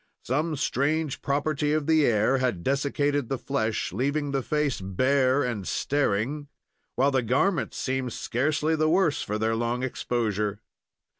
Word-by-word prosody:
Some 150 +5 -1
strange 145 +2 -1
property 145 +1 0
of 155 -1 0
the 160 -1 +4
air 115 +4 +2
had 120 -10 -1
dessicated 140 0 0
the 135 - -1
flesh, 115 -8 -2
leaving 140 +6 -1
the 135 -1 0
face 150 -4 -1
bare 130 +8 +2
and 110 -6 -3
staring, 145 +1 0 0.5
while 135 +3 +3
the 130 -1 +2
garments 135 - 0
seemed 130 -2 -2
scarcely 150 +8 0
the 155 0 +2
worse 165 -3 +2
for 105 - -2
their 110 +1 0
long 120 +2 -1
exposure. 105 -5 -1
135 Hz, 145 wpm, -26 LUFS, 120-145 Hz, 0.5 s, the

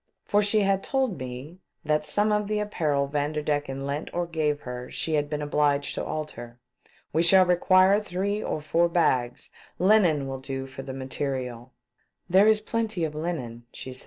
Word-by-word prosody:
for 205 - +3
she 210 +1 +2
had 195 -1 +1
told 265 -8 -1
me 130 +7 -8 0.3
that 150 0 +1
some 205 +8 +2
of 210 -1 +1
the 215 0 -1
apparel 155 -9 0
Vanderdecken 145 -1 -2
lent 140 +2 -4
or 175 0 0
gave 155 -3 -1
her 125 -1 -7
she 160 - -2
had 145 -1 +1
been 150 0 -3
obliged 145 -1 +1
to - - -3
alter. 120 -6 -6 0.3
" - - -32
We 160 - +3
shall 185 +2 +6
require 185 +3 +4
three 200 +1 -2
or 155 - -3
four 165 +3 +2
bags. 130 -8 0 0.3
Linen 180 -7 +3
will 135 0 -5
do 135 0 -5
for 135 0 -9
the 135 0 -7
material." 130 -2 -4 0.3
" - - -47
There 195 +3 +6
is 215 -1 +4
plenty 220 -5 -2
of 155 - -5
linen," 130 -8 -5
said - - -17
she. 130 -1 -8
150 Hz, 185 wpm, -26 LUFS, 135-190 Hz, 0.3 s, shall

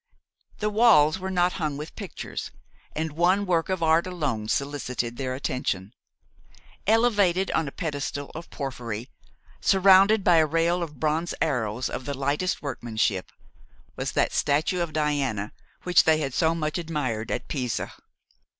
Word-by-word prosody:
The 210 0 -1
walls 200 -8 +5
were 190 +1 -4
not 180 -1 +2
hung 150 -3 -1
with 150 +2 -8
pictures, 200 -4 -6 0.5
and 160 0 -2
one 180 +6 +2
work 170 -2 +1
of 185 -3 -1
art 160 +2 +3
alone 145 -12 -2
solicited 125 -3 -2
their 130 0 -3
attention. 125 -7 -3 0.9
Elevated 205 -5 +3
on 160 - 0
a - - -5
pedestal 145 -4 -4
of 165 +2 -8
porphyry, 125 -4 -5 0.5
surrounded 195 +2 +5
by 175 -2 +5
a 160 - +5
rail 165 +3 +1
of 150 -5 -6
bronze 160 +2 0
arrows 120 -5 -1
of 130 - -5
the 140 -2 -4
lightest 145 +8 -1
workmanship, 110 -8 -2 0.6
was - - -3
that - - +1
statue 155 +5 +1
of 170 -2 -2
Diana 140 -9 -1 0.3
which 180 -1 +5
they 160 -1 +5
had 140 -4 -3
so 160 +3 +2
much 155 +1 -2
admired 140 -10 -3
at - - -3
Pisa. 125 -5 -3
155 Hz, 150 wpm, -26 LUFS, 135-175 Hz, 0.9 s, walls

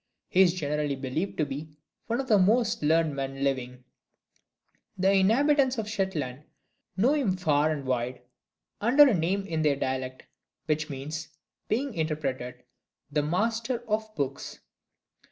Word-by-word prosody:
He 185 - +4
is 180 -2 +5
generally 150 -3 -1
believed 135 +8 -3
to 155 - +2
be 150 +2 -7 0.3
one 235 +2 0
of 270 - -3
the 215 -5 +5
most 225 +4 +3
learned 155 0 +2
men 135 0 -4
living. 125 -2 -2 1.1
The 190 +1 +3
inhabitants 260 +7 +3
of 220 -2 -2
Shetland 160 - -2 0.6
know 240 +9 +4
him 235 -12 +1
far 155 -4 +2
and 145 -3 -3
wide, 125 -1 -2 0.6
under 270 +7 +6
a 255 - +3
name 190 +3 0
in 160 -5 -2
their 150 -2 +3
dialect 130 -1 -3 0.4
which 155 0 -1
means, 150 +3 -5 0.4
being 260 +4 -1
interpreted, 145 -6 -3 0.5
"The 150 +1 +2
Master 225 - -1
of 220 0 -1
Books." 140 -1 -4
160 Hz, 140 wpm, -28 LUFS, 140-215 Hz, 1.1 s, under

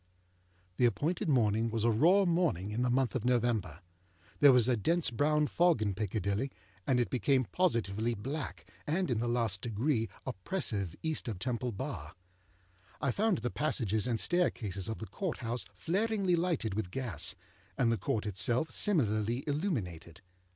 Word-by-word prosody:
The 125 - +4
appointed 155 +8 0
morning 115 -4 +2
was 115 -1 -1
a 115 - +4
raw 175 - +5
morning 165 - +1
in 110 +3 -1
the 125 - +2
month 130 0 +1
of 130 -5 -2
November. 115 - 0 0.6
There 145 -1 +8
was 125 -2 +5
a 125 - +3
dense 165 - +1
brown 150 +5 +2
fog 170 -1 +3
in 105 -2 0
Piccadilly, 100 +4 -1 0.4
and 130 -3 +3
it 120 -6 0
became 130 +1 +2
positively 115 - +1
black 135 +8 -5 0.2
and 165 0 0
in 115 - +1
the 120 - -1
last 115 -5 0
degree 115 +1 0 0.2
oppressive 105 - -2
East 160 -4 -1
of 110 -5 -3
Temple 125 +3 -2
Bar. 105 - -6 0.8
I 140 - +1
found 210 - +1
the 125 - -3
passages 115 -7 0
and 115 -3 0
staircases 105 - 0
of 110 - -3
the 110 - -6
Court 185 - -4
House 120 -2 -2
flaringly 195 - +1
lighted 165 - 0
with 100 -3 -2
gas, 95 - -4 0.4
and 115 -2 +3
the 115 - +1
Court 110 -1 -1
itself 110 - 0
similarly 120 - +1
illuminated. 110 - -3
120 Hz, 160 wpm, -32 LUFS, 105-150 Hz, 0.8 s, There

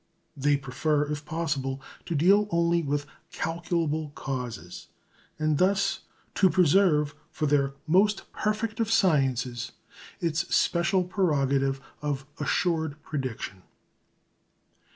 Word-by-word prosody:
They 145 0 +2
prefer, 145 +3 0
if 150 0 -4
possible, 145 -5 -2 0.3
to 170 - -1
deal 195 +7 +4
only 170 -1 +2
with 145 -1 -1 0.3
calculable 165 -2 -1
causes, 120 -10 -5 0.5
and 155 -1 +1
thus 195 +1 +2 0.3
to 190 - +4
preserve 165 -4 +4 0.2
for 155 - -2
their 140 -2 +2
"most 195 +6 +3
perfect 215 +1 -1
of 225 -1 0
sciences" 135 - +1 0.5
its 165 +1 0
special 170 +2 +2
prerogative 140 -7 +1 0.2
of 145 -2 -2
assured 160 -4 0
prediction. 130 -9 -4
155 Hz, 105 wpm, -27 LUFS, 140-175 Hz, 0.5 s, deal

